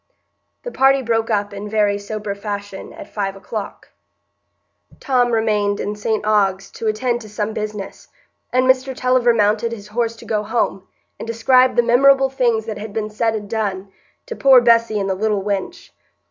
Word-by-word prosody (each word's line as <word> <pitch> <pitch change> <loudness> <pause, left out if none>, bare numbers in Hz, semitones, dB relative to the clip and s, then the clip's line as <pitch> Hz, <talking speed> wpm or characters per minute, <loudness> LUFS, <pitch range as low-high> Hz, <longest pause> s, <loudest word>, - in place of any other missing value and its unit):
The - - -6
party 270 - +3
broke 225 -1 0
up 205 -2 -1
in 200 +1 -7
very 205 -1 +1
sober 210 0 -5
fashion 200 -1 -6
at 310 -1 -12
five 195 -2 -2
o'clock. 200 +1 -7 1.1
Tom 250 -2 +1
remained 210 -3 +1
in 205 +1 -3
St 210 0 -2
Ogg's 200 -2 +1
to 225 - -5
attend 240 +3 -1
to 215 - -11
some 210 +1 -3
business, 210 -2 -6 0.4
and 255 +1 +2
Mr 260 0 +2
Tulliver 250 -1 +3
mounted 215 +1 +1
his 210 -3 -8
horse 230 +1 -1
to - - -14
go 215 -2 -1
home, 210 -3 -2 0.3
and - - -7
describe 255 +3 +3
the 240 - +4
memorable 270 +3 +4
things 235 -4 +1
that 220 -2 -5
had 210 0 -7
been 215 -1 -3
said 225 +1 0
and 210 -1 -5
done, 200 -3 -3 0.3
to 485 -2 -6
"poor 270 -7 +6
Bessy 230 -2 +3
and 195 - -2
the 190 - 0
little 205 0 -1
wench." 210 - -4
220 Hz, 175 wpm, -19 LUFS, 205-240 Hz, 1.1 s, poor